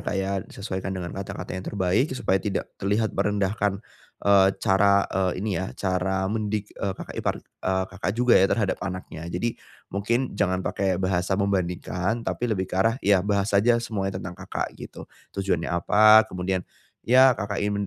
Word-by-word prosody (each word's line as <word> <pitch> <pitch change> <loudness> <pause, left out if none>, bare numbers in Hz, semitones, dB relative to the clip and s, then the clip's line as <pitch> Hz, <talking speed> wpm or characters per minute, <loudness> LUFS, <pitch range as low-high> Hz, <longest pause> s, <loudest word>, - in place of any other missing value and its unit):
Kak 100 - -2
ya. 95 0 -1
Disesuaikan 95 -1 -5
dengan 85 -1 -5
kata-kata 95 0 -6
yang 95 0 -5
terbaik 100 +7 +1
supaya 95 -4 +1
tidak 105 - -3
terlihat 105 +3 0
merendahkan, 100 -1 0 0.5
eee, 100 -1 +6
cara, 100 +1 +3
eee, 95 -1 0
ini 95 -4 -1
ya 95 - -6
cara 95 0 0
mendidik, 105 0 -2
eee, 100 -1 -3
kakak - - -8
ipar, - - 0
eee, 95 0 -2
Kakak 95 0 -4
juga 125 0 +3
ya 95 - +4
terhadap 100 -4 0
anaknya. 90 -4 -6
Jadi 115 +7 -3 0.3
mungkin 115 +6 0
jangan 95 -2 0
pake 95 -2 0
bahasa 95 0 0
membandingkan, 95 +2 -1
tapi 120 - -2
lebih 95 -4 0
ke - - -8
arah 115 +4 +3
ya 100 -2 +5
bahas 100 +1 0
aja 115 +4 +4
semuanya 100 -5 -3
tentang 90 -1 -6
Kakak - - -4
gitu. - - -10 0.3
Tujuannya 95 -4 0
apa 110 +5 +6
kemudian, 90 0 -2 0.4
ya, 130 +1 +6
Kakak 100 0 -2
ingin 100 -1 -1
100 Hz, 170 wpm, -25 LUFS, 95-105 Hz, 0.5 s, eee